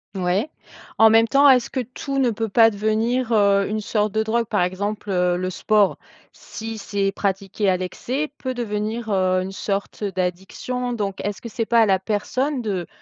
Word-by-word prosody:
Ouais. 190 Hz, +9 st, 0 dB, 0.5 s
En 220 Hz, 0 st, +7 dB
même 225 Hz, +1 st, +5 dB
temps, 280 Hz, +2 st, +6 dB
est-ce 250 Hz, -2 st, +4 dB
que 265 Hz, -, -3 dB
tout 255 Hz, +3 st, -4 dB
ne 250 Hz, -3 st, +3 dB
peut 225 Hz, 0 st, -3 dB
pas 225 Hz, +2 st, +6 dB
devenir, 225 Hz, +4 st, 0 dB
heu, 200 Hz, -2 st, +4 dB
une 215 Hz, +1 st, -1 dB
sorte 210 Hz, 0 st, -1 dB
de 220 Hz, +1 st, 0 dB
drogue? 230 Hz, +2 st, 0 dB
Par 200 Hz, -, 0 dB
exemple, 205 Hz, +3 st, -2 dB
heu, 180 Hz, -1 st, +1 dB
le 185 Hz, 0 st, -2 dB
sport, 210 Hz, +1 st, +2 dB, 0.4 s
si 225 Hz, 0 st, -8 dB
c'est 200 Hz, -1 st, -2 dB
pratiqué 195 Hz, 0 st, -1 dB
à 185 Hz, -, +2 dB
l'excès 255 Hz, -, -3 dB
peut 260 Hz, -1 st, -4 dB
devenir, 220 Hz, -1 st, -3 dB
heu, 185 Hz, -2 st, +2 dB
une 190 Hz, +1 st, -5 dB
sorte 200 Hz, +1 st, -4 dB
d'addiction 190 Hz, +7 st, -3 dB
donc 205 Hz, -5 st, -3 dB
est-ce 205 Hz, 0 st, -4 dB
que -, -, -7 dB
c'est 225 Hz, 0 st, -3 dB
pas 235 Hz, +1 st, +3 dB
à 225 Hz, -, +6 dB
la 195 Hz, -2 st, +3 dB
personne 240 Hz, +8 st, -2 dB
de 190 Hz, -6 st, -3 dB
210 Hz, 190 wpm, -22 LUFS, 195-235 Hz, 0.5 s, En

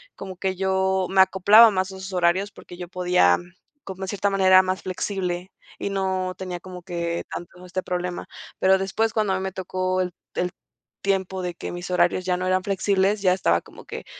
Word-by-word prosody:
como 190 Hz, -2 st, -8 dB
que 190 Hz, 0 st, -1 dB
yo 190 Hz, 0 st, +1 dB
me 195 Hz, -, +1 dB
acoplaba 190 Hz, +4 st, +7 dB
más 190 Hz, 0 st, -1 dB
a 190 Hz, -, -9 dB
sus 190 Hz, 0 st, -7 dB
horarios 180 Hz, +3 st, +2 dB
porque 175 Hz, -, -13 dB
yo 180 Hz, -1 st, -7 dB
podía, 180 Hz, -, +3 dB, 0.5 s
como 190 Hz, 0 st, -7 dB
en -, -, -10 dB
cierta 200 Hz, +1 st, 0 dB
manera 190 Hz, -1 st, +6 dB
más 185 Hz, 0 st, -2 dB
flexible 185 Hz, -1 st, -3 dB, 0.3 s
y -, -, -3 dB
no 190 Hz, -1 st, -1 dB
tenía 180 Hz, -2 st, -5 dB
como 180 Hz, -1 st, -10 dB
que 170 Hz, -2 st, -3 dB
tanto 180 Hz, +1 st, -8 dB
este 185 Hz, +1 st, -4 dB
problema. 180 Hz, 0 st, -3 dB, 0.3 s
Pero 190 Hz, 0 st, +5 dB
después 195 Hz, +4 st, 0 dB
cuando 215 Hz, -3 st, +1 dB
a -, -, +1 dB
mí 190 Hz, -, -4 dB
me 190 Hz, -, -3 dB
tocó 185 Hz, 0 st, -2 dB
el 180 Hz, -1 st, 0 dB, 0.2 s
el 180 Hz, 0 st, -1 dB, 0.5 s
tiempo 190 Hz, -1 st, 0 dB
de 180 Hz, -, -3 dB
que -, -, -7 dB
mis 175 Hz, +1 st, -6 dB
horarios 180 Hz, 0 st, +2 dB
ya 180 Hz, -1 st, +1 dB
no 180 Hz, +1 st, -2 dB
eran 185 Hz, 0 st, +1 dB
flexibles, 195 Hz, +1 st, +1 dB
ya 185 Hz, -2 st, +4 dB
estaba 85 Hz, -, +2 dB
como -, -, -15 dB
que -, -, -8 dB
185 Hz, 205 wpm, -24 LUFS, 180-190 Hz, 0.5 s, acoplaba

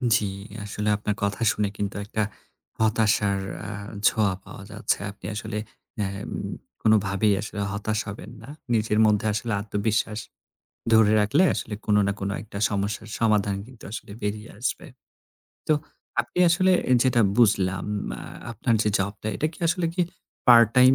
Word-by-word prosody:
জ্বী, 105 Hz, -, +1 dB, 0.4 s
আসলে 105 Hz, +1 st, -2 dB
আপনার 105 Hz, 0 st, -2 dB
কথা 100 Hz, +3 st, -1 dB
শুনে 105 Hz, -, 0 dB
কিন্তু 100 Hz, -2 st, -2 dB
একটা 110 Hz, +1 st, -1 dB, 0.6 s
হতাশার 110 Hz, -2 st, +2 dB, 0.3 s
আ -, -, -5 dB, 0.4 s
ছোঁয়া 105 Hz, -3 st, +2 dB
পাওয়া 100 Hz, -, -10 dB
যাচ্ছে। 105 Hz, -, 0 dB
আপনি 100 Hz, -, -14 dB
আসলে 105 Hz, 0 st, -4 dB, 0.5 s
এম 100 Hz, 0 st, -4 dB, 0.5 s
কোনভাবেই 105 Hz, -1 st, +3 dB
আসলে 105 Hz, 0 st, -6 dB
হতাশ 105 Hz, +1 st, -1 dB
হবেন 105 Hz, +2 st, -7 dB
না। 115 Hz, -, -11 dB, 0.2 s
নিজের 110 Hz, -1 st, +2 dB
মধ্যে 105 Hz, 0 st, +3 dB
আসলে 115 Hz, +2 st, -2 dB
আত্মবিশ্বাস 105 Hz, +1 st, -1 dB, 0.7 s
ধরে 110 Hz, -1 st, +6 dB
রাখলে 130 Hz, -, +3 dB
আসলে 110 Hz, -, -4 dB
কোন 105 Hz, -, +4 dB
না 100 Hz, -, +1 dB
কোন 100 Hz, 0 st, -1 dB
একটা 100 Hz, -1 st, -8 dB
সমস্যার 105 Hz, +1 st, -2 dB
সমাধান 105 Hz, -3 st, +2 dB
কিন্তু 125 Hz, -3 st, -14 dB
আসলে 105 Hz, -, -7 dB
বেরিয়ে 105 Hz, +2 st, -3 dB
আসবে। 125 Hz, -, -2 dB, 0.8 s
তো -, -, +6 dB, 0.5 s
আপনি -, -, -6 dB
আসলে 185 Hz, +2 st, +4 dB, 0.2 s
এ -, -, +6 dB
যেটা 125 Hz, -2 st, +3 dB, 0.2 s
বুঝলাম 100 Hz, -5 st, +3 dB, 0.3 s
আ -, -, -8 dB, 0.3 s
আপনার 115 Hz, +1 st, 0 dB
যে 105 Hz, -, +1 dB
জবটা 100 Hz, +2 st, -3 dB
এটা 155 Hz, -, +1 dB
কি -, -, -15 dB
আসলে 170 Hz, +1 st, +1 dB
কি 180 Hz, -, 0 dB, 0.5 s
পার্ট-টাইম 120 Hz, +2 st, +7 dB
105 Hz, 150 wpm, -25 LUFS, 100-115 Hz, 0.8 s, পার্ট-টাইম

